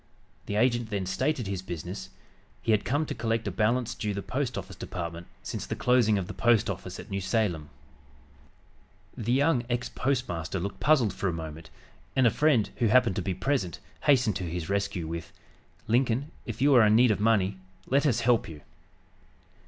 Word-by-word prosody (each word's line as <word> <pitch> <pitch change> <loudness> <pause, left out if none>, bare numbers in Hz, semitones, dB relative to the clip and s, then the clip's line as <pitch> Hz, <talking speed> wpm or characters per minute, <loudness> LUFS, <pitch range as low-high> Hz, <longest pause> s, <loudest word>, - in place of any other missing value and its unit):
The 105 - -2
agent 120 0 +2
then 100 -3 -2
stated 125 +7 -1
his 95 -2 -3
business; 90 +1 -6 0.5
he 115 - +1
had 105 -1 +3
come 145 +4 0
to - - -4
collect 115 0 -1
a - - -1
balance 115 +2 +1
due 105 -3 -3
the 100 - -4
Post 130 -2 -2
Office - - -6
Department 85 -1 -6 0.2
since - - -5
the - - -3
closing 120 -4 +3
of 95 - -2
the - - -7
post 120 -3 +3
office - - -7
at - - -10
New 100 0 -2
Salem. 95 -6 -1 1.5
The 115 +1 -2
young 135 0 +3
ex 120 +1 -1
postmaster 95 - -2
looked 100 +3 -5
puzzled 125 -6 +3
for 100 - -2
a - - +1
moment, 80 0 -7 0.5
and 130 - +4
a 115 - +5
friend, 140 -5 +2
who 120 - +2
happened 120 -3 +4
to - - 0
be 95 0 -2
present, 125 - -1 0.3
hastened 125 -8 +4
to 95 - -5
his 85 0 -4
rescue 100 -4 -1
with, 85 +1 -6 0.5
"Lincoln, 125 +5 +1 0.2
if 135 - -3
you 145 0 +5
are 120 -3 +7
in 105 - +5
need 120 0 +6
of 105 - 0
money, 100 -3 +2 0.3
let 140 +3 +3
us 120 -4 +1
help 115 -4 +2
you." 75 -2 -10
110 Hz, 190 wpm, -28 LUFS, 95-125 Hz, 1.5 s, are